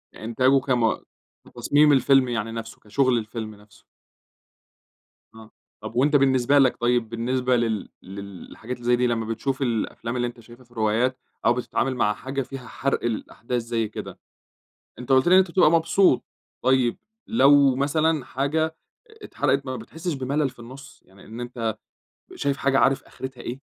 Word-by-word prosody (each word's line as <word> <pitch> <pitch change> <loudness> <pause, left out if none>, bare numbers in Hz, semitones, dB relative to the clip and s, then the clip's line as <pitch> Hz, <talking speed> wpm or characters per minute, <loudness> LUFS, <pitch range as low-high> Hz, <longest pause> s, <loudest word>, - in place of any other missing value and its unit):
إنتاجه 130 +5 +2
كم 120 -4 +1 0.5
في - - -18
تصميم 145 +5 +4
الفيلم 135 -1 +4
يعني 115 -2 -2
نفسه 115 0 -7
كشغل 130 +3 +1
الفيلم 110 -1 -5
نفسه. 105 +2 -21 1.5
آه، 110 -1 -14 0.3
طب - - -8
وأنتَ 145 +5 +3
بالنسبة 135 0 +4
لَك 130 -2 +3
طيب 120 -1 +1
بالنسبة 125 +2 0
لل 115 -4 -1
للحاجات 100 +5 -8
اللي 120 - -13
زي 120 0 +4
دي 125 0 +1
لما 115 -2 -1
بتشوف 130 +5 -3
الأفلام 115 -1 -2
اللي 120 -1 0
أنتَ 120 0 -9
شايفها 120 +2 -15
في 120 - -32
الروايات، 115 +3 0 0.3
أو 120 - +5
بتتعامل 130 +1 -2
مع 105 -4 +1
حاجة 135 +5 -4
فيها 135 -1 -8
حرْق 140 0 -2
الأحداث 120 +1 -3
زي 115 -1 -2
كده. 105 - -8 0.8
أنتَ 125 +2 -3
قُلت 130 +4 +4
لي - - +4
إن - - +8
أنتَ 190 -2 +3
بتبقى 170 -3 +4
مبسوط، 165 -2 +3 0.4
طيب، 130 -2 +2 0.3
لو 140 - +5
مثلًا 155 +1 +1
حاجة 155 +4 -1 0.5
اتحرقت 140 - 0
بقى 130 - -4
ما - - -4
بتحسش 165 +9 -5
بملل 140 +2 -1
في 125 - -24
النص؟ 130 +4 -12
يعني 95 +1 -19
إن 115 +2 -9
أنتَ 115 -3 -4 0.6
شايف 140 -1 -1
حاجة 135 -1 +1
عارف 135 0 +3
آخرتها 130 -1 -9
إيه. 125 +3 -6
125 Hz, 165 wpm, -24 LUFS, 115-135 Hz, 1.5 s, إن